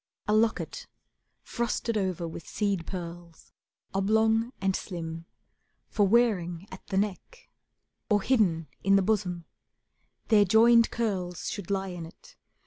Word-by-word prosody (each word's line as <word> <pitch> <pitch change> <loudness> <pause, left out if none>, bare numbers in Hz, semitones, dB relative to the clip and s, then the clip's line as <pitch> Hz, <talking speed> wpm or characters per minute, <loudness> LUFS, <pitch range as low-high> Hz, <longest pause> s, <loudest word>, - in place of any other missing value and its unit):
A 210 - +2
locket, 220 +1 0 0.6
frosted 235 -1 -2
over 185 -4 -1
with 160 -1 -9
seed 200 -5 -1
pearls, 170 -2 -8 0.4
Oblong 220 +4 +2
and 190 0 0
slim, 165 -2 -6 0.6
for 205 -2 +2
wearing 195 -6 +1
at 185 - -11
the 195 - -2
neck, 210 - -3 0.6
Or 205 -2 +3
hidden 185 -11 +2 0.2
in 195 +1 +4
the 195 - +4
bosom; 185 -5 -1 0.8
their 210 -2 +6
joined 230 +4 +5
curls 185 -7 -2
Should 200 -3 -6
lie 195 -1 -1
in 175 -2 -6
it. 165 - -18
195 Hz, 130 wpm, -28 LUFS, 175-220 Hz, 0.8 s, their